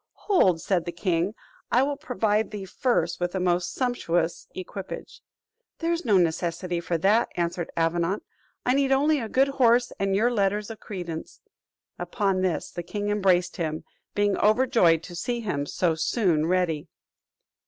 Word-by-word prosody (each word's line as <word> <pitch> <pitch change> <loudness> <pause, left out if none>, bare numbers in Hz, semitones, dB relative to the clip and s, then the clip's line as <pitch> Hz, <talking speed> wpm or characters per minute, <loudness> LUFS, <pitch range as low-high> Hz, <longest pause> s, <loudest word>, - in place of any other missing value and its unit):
"Hold," 190 - +4
said 175 -1 0
the 175 - -3
king, 175 +3 -1 0.4
"I 250 - +4
will 285 +1 -1
provide 225 -7 0
thee 205 -2 -6
first 185 -4 0
with 175 +1 -2
a - - 0
most 180 -1 +1
sumptuous 175 -10 -1
equipage." 185 +1 -7 0.6
"There 335 0 -1
is 335 -2 -3
no 210 -4 +4
necessity 175 +1 0
for 170 0 -1
that," 205 +8 +3
answered 170 0 -1
Avenant; 170 +4 0 0.4
"I 250 - +3
need 275 0 +2
only 290 +3 +3
a 225 -3 -4
good 270 +4 +3
horse 245 -3 +3
and 195 -1 +1
your 230 +5 +3
letters 205 0 0
of 220 - -9
credence." 175 -5 -7 0.6
Upon 195 -4 0
this 185 -3 -1
the 175 - -5
king 205 +4 -4
embraced 190 -4 +2
him; 155 -2 -3 0.3
being 205 -1 +2
overjoyed 215 - +4
to 175 - -9
see 240 +6 -2
him 145 -10 -2
so 170 +2 +1
soon 160 -2 +1
ready. 175 -3 0
195 Hz, 160 wpm, -26 LUFS, 170-230 Hz, 0.6 s, Hold